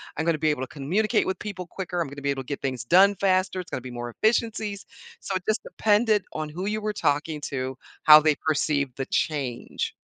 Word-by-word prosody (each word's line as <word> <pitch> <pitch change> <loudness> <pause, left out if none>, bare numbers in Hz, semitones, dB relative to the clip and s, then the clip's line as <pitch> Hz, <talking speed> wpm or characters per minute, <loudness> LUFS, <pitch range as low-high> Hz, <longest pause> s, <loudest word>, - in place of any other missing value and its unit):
I'm 160 - -2
gonna 165 -2 +2
be 155 0 +2
able 130 - -3
to 130 - -3
communicate 200 - 0
with 190 -1 -2
people 190 -4 -6
quicker, 180 0 -5
I'm 165 - 0
gonna 140 +1 -9
be 140 - -1
able 135 -1 -1
to - - -26
get 140 - -4
things 130 -3 -3
done 195 +9 +5
faster, 185 -1 +1
it's 180 - -8
gonna 130 - -3
be 130 - -8
more 120 0 -5
efficiencies." 215 - 0 0.4
So, 195 - -4
it 185 - -2
just 215 - 0
depended 210 -2 +2
on 155 -1 -4
who 180 +6 -5
you 215 +1 -1
were 210 0 -2
talking 150 -1 -1
to, 130 -1 -3 0.3
how 155 0 +10
they 155 -1 +3
perceived 145 -4 0
the 135 - -4
change. 135 -6 -2
160 Hz, 225 wpm, -25 LUFS, 140-195 Hz, 0.4 s, how